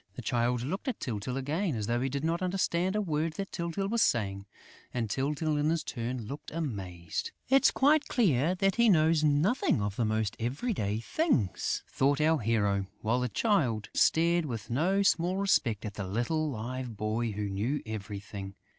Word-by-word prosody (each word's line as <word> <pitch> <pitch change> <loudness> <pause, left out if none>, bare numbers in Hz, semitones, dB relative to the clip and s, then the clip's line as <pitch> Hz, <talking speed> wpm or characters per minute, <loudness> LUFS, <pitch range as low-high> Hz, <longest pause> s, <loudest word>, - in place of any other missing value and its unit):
The - - -7
Child 120 0 0
looked 190 - -4
at 255 - -2
Tyltyl 125 +2 -3
again 150 +4 -1
as 105 -2 -2
though 120 +3 0
he 135 - 0
did 140 +2 -3
not 165 +2 0
understand 185 0 0
a 210 - +2
word 160 -2 -1
that 195 +4 -5
Tyltyl 170 +3 -2
was 230 +2 +1
saying; 100 - +1 0.4
and 120 -2 -2
Tyltyl 150 +3 0
in 150 +1 +2
his 165 0 0
turn 120 -1 -4
looked 140 +6 -7
amazed: 95 - -4 0.2
"It's 270 +1 +6
quite 295 +2 +3
clear 175 - +2
that 195 +3 +1
he 235 -1 +5
knows 160 -3 +4
nothing 150 - +2
of 100 -1 -2
the 120 - +1
most 110 -1 0
everyday 120 - -1
things," 125 - 0
thought 140 +1 +1
our 155 +1 +3
hero, 100 -4 +1
while 115 +2 +1
the 125 0 -1
child 130 - +1
stared 170 +1 +3
with 115 -3 -5
no 185 +10 +2
small 180 -1 +2
respect 130 - +1
at 105 - -5
"the 100 -3 -5
little 150 - 0
Live 125 -1 -5
Boy" 110 +2 -1
who 105 0 -2
knew 110 +9 -2
everything. 100 -2 -6
135 Hz, 180 wpm, -30 LUFS, 110-170 Hz, 0.4 s, It's